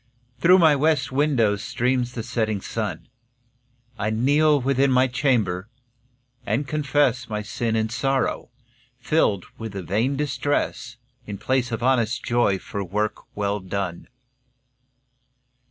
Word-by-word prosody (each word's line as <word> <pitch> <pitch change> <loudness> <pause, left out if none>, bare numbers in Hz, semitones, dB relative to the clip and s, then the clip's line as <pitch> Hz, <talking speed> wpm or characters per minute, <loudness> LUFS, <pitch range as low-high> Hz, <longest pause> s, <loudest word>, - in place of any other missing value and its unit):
Through 180 +7 +6
my 160 -5 +5
west 145 -2 +1
window 130 -7 +2
streams 125 +2 -1
the 115 - -4
setting 110 -3 -1
sun. 110 +3 -4 0.9
I 110 +1 0
kneel 145 +7 +3
within 135 +1 +2
my 130 0 +4
chamber, 115 -8 0 0.7
and 135 +4 -1
confess 145 -4 +1
My 105 -1 -3
sin 110 +2 -2
and 110 0 0
sorrow, 135 +1 -1 0.5
filled 120 - +1
with 110 -2 -6
vain 105 +8 -1
distress, 140 -4 -2 0.3
In 100 -1 -5
place 125 +3 0
of 115 0 -3
honest 125 -3 +1
joy 120 -5 +2
for 100 +1 -5
work 105 +4 -2 0.2
well 100 0 -1
done. 95 -2 -4
120 Hz, 120 wpm, -23 LUFS, 105-135 Hz, 0.9 s, Through